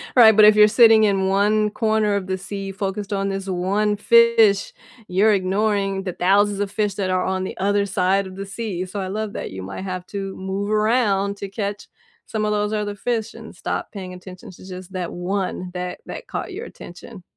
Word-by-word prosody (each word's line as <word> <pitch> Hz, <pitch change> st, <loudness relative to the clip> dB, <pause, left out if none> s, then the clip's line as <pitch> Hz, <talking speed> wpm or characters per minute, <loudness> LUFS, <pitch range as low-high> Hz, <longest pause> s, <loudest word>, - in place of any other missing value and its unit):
Right, 220 Hz, -4 st, +8 dB
but 215 Hz, -1 st, +8 dB
if 210 Hz, 0 st, +7 dB
you're 210 Hz, 0 st, +7 dB
sitting 225 Hz, 0 st, +6 dB
in 195 Hz, -2 st, +2 dB
1 210 Hz, +2 st, +2 dB
corner 215 Hz, -3 st, +1 dB
of 190 Hz, -2 st, -3 dB
the 190 Hz, 0 st, -2 dB
sea 195 Hz, +1 st, -6 dB
focused 200 Hz, +1 st, -4 dB
on 195 Hz, 0 st, -1 dB
this 195 Hz, 0 st, -4 dB
1 200 Hz, +3 st, 0 dB
fish, 230 Hz, -2 st, +4 dB, 0.3 s
you're 205 Hz, +4 st, +3 dB
ignoring 195 Hz, 0 st, 0 dB
the 185 Hz, -3 st, -4 dB
thousands 200 Hz, +2 st, +2 dB
of 200 Hz, -1 st, -2 dB
fish 205 Hz, -2 st, -1 dB
that 190 Hz, -2 st, -2 dB
are 185 Hz, 0 st, 0 dB
on 190 Hz, 0 st, -1 dB
the -, -, -6 dB
other 200 Hz, +1 st, +1 dB
side 195 Hz, 0 st, +1 dB
of 185 Hz, -, -10 dB
the 195 Hz, 0 st, -6 dB
sea, 195 Hz, -3 st, -4 dB
so 200 Hz, +2 st, -6 dB
I 190 Hz, -, -3 dB
love 210 Hz, +1 st, -4 dB
that -, -, -5 dB
you 95 Hz, 0 st, -7 dB
might 100 Hz, -, -7 dB
have 185 Hz, -1 st, -5 dB
to 195 Hz, -1 st, -5 dB
move 195 Hz, +2 st, -3 dB
around 210 Hz, -2 st, +1 dB
to 200 Hz, -1 st, -6 dB
catch 200 Hz, 0 st, -4 dB, 0.4 s
some 215 Hz, -1 st, -2 dB
of 210 Hz, -, 0 dB
those 210 Hz, 0 st, 0 dB
other 205 Hz, -1 st, -2 dB
fish 225 Hz, 0 st, -2 dB
and -, -, -11 dB
stop -, -, -4 dB
paying 185 Hz, -3 st, -7 dB
attention 180 Hz, 0 st, -11 dB
to 185 Hz, -, -15 dB
just 185 Hz, 0 st, -9 dB
that 180 Hz, -2 st, -4 dB
1 180 Hz, 0 st, -3 dB
that 180 Hz, 0 st, -5 dB
that -, -, -8 dB
caught 385 Hz, -, -5 dB
your 445 Hz, +5 st, -6 dB
attention. 185 Hz, -, -12 dB
200 Hz, 210 wpm, -22 LUFS, 190-210 Hz, 0.4 s, Right